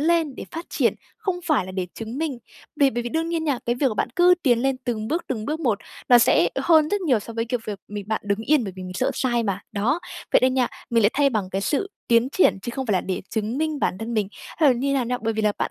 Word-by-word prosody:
lên, 320 Hz, -3 st, +2 dB
để -, -, -7 dB
phát 330 Hz, +1 st, -6 dB
triển, -, -, +1 dB, 0.2 s
không 380 Hz, -5 st, -2 dB
phải 260 Hz, -, +2 dB
là 185 Hz, -, -7 dB
để 185 Hz, -1 st, -2 dB
chứng 225 Hz, +4 st, -6 dB
minh. 305 Hz, -6 st, -2 dB, 0.4 s
Vì 280 Hz, -2 st, +4 dB
bởi 240 Hz, +1 st, -2 dB
vì 240 Hz, -, -3 dB
đương 325 Hz, +4 st, -1 dB
nhiên 330 Hz, -1 st, -1 dB
nha, 280 Hz, -5 st, 0 dB
cái 240 Hz, -, +2 dB
việc 270 Hz, +2 st, +1 dB
mà 215 Hz, -, -4 dB
bạn -, -, 0 dB
cứ 360 Hz, +1 st, +6 dB
tiến 245 Hz, -4 st, +4 dB
lên 270 Hz, -1 st, +1 dB
từng 220 Hz, -3 st, -2 dB
bước, 335 Hz, +2 st, -1 dB
từng 220 Hz, -4 st, -3 dB
bước 310 Hz, +4 st, -3 dB
một, 225 Hz, -8 st, +1 dB, 0.3 s
nó 245 Hz, -1 st, +8 dB
sẽ 175 Hz, -7 st, +4 dB
hơn 315 Hz, +1 st, +4 dB
rất 410 Hz, +4 st, 0 dB
nhiều 265 Hz, -, +2 dB
so 230 Hz, -, -9 dB
với, 230 Hz, 0 st, -1 dB
kiểu, 235 Hz, 0 st, -2 dB
việc 205 Hz, -2 st, -4 dB
mình 205 Hz, -1 st, -5 dB
bạn 220 Hz, -, 0 dB
đứng 200 Hz, 0 st, 0 dB
yên 285 Hz, +1 st, +2 dB
bởi 195 Hz, -, -5 dB
vì 185 Hz, -, -7 dB
mình 185 Hz, 0 st, -7 dB
sợ 255 Hz, -, +1 dB
sai 240 Hz, -3 st, +1 dB
mà. 200 Hz, -2 st, -2 dB
Đó, 230 Hz, +11 st, 0 dB, 0.3 s
vậy -, -, +6 dB
nên 255 Hz, 0 st, +3 dB
nha, 255 Hz, -2 st, +3 dB, 0.2 s
mình 230 Hz, -2 st, +3 dB
lại 205 Hz, -, +5 dB
thay 280 Hz, 0 st, +3 dB
bằng 205 Hz, -5 st, -2 dB
cái 195 Hz, -, -1 dB
sự 315 Hz, -, -1 dB, 0.2 s
tiến 235 Hz, +2 st, +4 dB
triển 325 Hz, -, +3 dB
chứ 240 Hz, -, -4 dB
không 265 Hz, -1 st, -3 dB
phải 210 Hz, -, +1 dB
là 185 Hz, -, +2 dB
để 185 Hz, -, -3 dB
chứng 220 Hz, +4 st, -2 dB
minh 310 Hz, -2 st, -1 dB
bản 185 Hz, -, 0 dB
thân 230 Hz, +1 st, -4 dB
mình 210 Hz, -3 st, 0 dB, 0.3 s
hay 305 Hz, -3 st, +5 dB
là 255 Hz, -, +5 dB
như 275 Hz, +3 st, -1 dB
nào 260 Hz, -3 st, +1 dB
nha. 250 Hz, +1 st, -2 dB
Bởi 225 Hz, 0 st, 0 dB
vì 220 Hz, 0 st, -2 dB
là 210 Hz, -1 st, +3 dB
bạn -, -, -1 dB
245 Hz, 300 wpm, -23 LUFS, 215-295 Hz, 0.4 s, nó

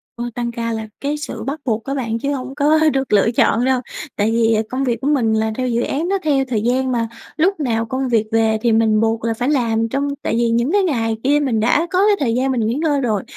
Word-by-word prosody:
Ô, 240 Hz, -, -5 dB
tăng 240 Hz, -1 st, -2 dB
ca 230 Hz, 0 st, -3 dB
là 220 Hz, -1 st, -4 dB
cái 290 Hz, +2 st, -1 dB
sự 300 Hz, -, -6 dB
bắt 280 Hz, +3 st, -4 dB
buộc 225 Hz, -3 st, -1 dB
á 275 Hz, -, -4 dB
bạn, 230 Hz, -4 st, -2 dB
chứ 280 Hz, +4 st, -1 dB
hông 260 Hz, 0 st, -5 dB
có 300 Hz, +2 st, +3 dB
được 270 Hz, -4 st, -1 dB
lựa 210 Hz, +2 st, +4 dB
chọn 235 Hz, 0 st, +2 dB
đâu. 260 Hz, -1 st, +2 dB, 0.4 s
Tại 210 Hz, +2 st, +1 dB
vì 225 Hz, -1 st, +2 dB
công 260 Hz, +2 st, -2 dB
việc 240 Hz, -3 st, -1 dB
của 275 Hz, -, -2 dB
mình 250 Hz, -7 st, +2 dB
là 220 Hz, 0 st, 0 dB
theo 255 Hz, -1 st, -1 dB
dự 235 Hz, -1 st, 0 dB
án 310 Hz, +8 st, -2 dB
đó, 395 Hz, -, +2 dB
theo 280 Hz, -3 st, +2 dB
thời 230 Hz, -5 st, -1 dB
gian 255 Hz, +3 st, 0 dB
mà. 230 Hz, -2 st, 0 dB, 0.3 s
Lúc 360 Hz, +3 st, +1 dB
nào 230 Hz, -6 st, 0 dB
công 260 Hz, +3 st, -2 dB
việc 225 Hz, -3 st, +2 dB
về 225 Hz, -1 st, +2 dB
thì 235 Hz, -, +2 dB
mình 220 Hz, -1 st, +3 dB
buộc 225 Hz, 0 st, 0 dB
là 230 Hz, 0 st, 0 dB
phải 245 Hz, +4 st, -2 dB
làm 230 Hz, -5 st, +1 dB
trong 275 Hz, +3 st, -1 dB
tại -, -, -2 dB
vì 235 Hz, 0 st, +1 dB
những 235 Hz, +5 st, +1 dB
cái 405 Hz, +1 st, +3 dB
ngày 225 Hz, -10 st, 0 dB
kia 285 Hz, +3 st, +3 dB
mình 260 Hz, -6 st, 0 dB
đã 270 Hz, +9 st, +2 dB
có 365 Hz, -, +1 dB
cái 420 Hz, -, +4 dB
thời 240 Hz, -5 st, 0 dB
gian 265 Hz, +2 st, +1 dB
mình 250 Hz, -3 st, 0 dB
nghỉ 225 Hz, -, 0 dB
ngơi 290 Hz, 0 st, 0 dB
rồi 215 Hz, -6 st, -1 dB
245 Hz, 270 wpm, -19 LUFS, 225-275 Hz, 0.4 s, lựa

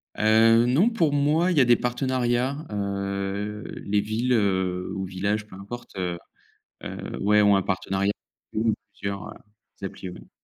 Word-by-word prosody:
Heu, 115 Hz, +2 st, +5 dB
non 155 Hz, -, +4 dB
pour 165 Hz, -11 st, +1 dB
moi, 155 Hz, +5 st, +3 dB
il 165 Hz, -, 0 dB
y -, -, +7 dB
a 130 Hz, -, +5 dB
des 120 Hz, -, +6 dB
partenariats, 130 Hz, +3 st, 0 dB
heu, 100 Hz, +1 st, -3 dB, 0.2 s
les 100 Hz, 0 st, +2 dB
villes, 115 Hz, +4 st, 0 dB
heu, 95 Hz, -4 st, 0 dB
ou 95 Hz, 0 st, -3 dB
villages 100 Hz, +3 st, -1 dB
peu 95 Hz, -, -12 dB
importe, 120 Hz, +5 st, -9 dB
heu 90 Hz, -2 st, -2 dB, 0.7 s
heu, -, -, -6 dB
ouais 105 Hz, +1 st, +4 dB
ont 100 Hz, -1 st, +5 dB
un 95 Hz, -, +2 dB
partenariat 95 Hz, +1 st, 0 dB, 0.4 s
ou 110 Hz, +1 st, +2 dB, 0.2 s
plusieurs, 100 Hz, 0 st, -5 dB
heu, -, -, -9 dB, 0.5 s
applis, 95 Hz, 0 st, -7 dB
oui. -, -, -12 dB
105 Hz, 160 wpm, -25 LUFS, 100-125 Hz, 0.7 s, y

